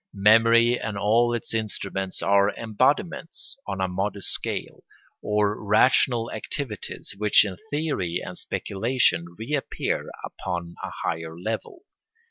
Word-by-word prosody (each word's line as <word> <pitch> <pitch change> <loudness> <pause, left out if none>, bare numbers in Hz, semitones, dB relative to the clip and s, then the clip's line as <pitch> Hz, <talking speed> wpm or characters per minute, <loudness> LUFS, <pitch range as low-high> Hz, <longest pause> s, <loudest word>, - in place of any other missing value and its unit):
Memory 115 +4 +5
and 110 -2 -4
all 115 +4 +3
its 120 -1 -3
instruments 100 -3 -2
are 100 0 +4
embodiments, 140 - 0
on 95 - -3
a 95 - +1
modest 95 +2 -1
scale, - - -4 0.4
of 105 0 +1
rational 115 +2 +3
activities 115 -9 -5
which 105 0 +6
in 95 -3 -4
theory 145 - -1
and 90 - -7
speculation 100 -6 0
reappear 135 +6 -2 0.2
upon 85 -2 -5
a - - -3
higher 80 0 -3
level. 110 - -5
105 Hz, 115 wpm, -25 LUFS, 95-120 Hz, 0.4 s, which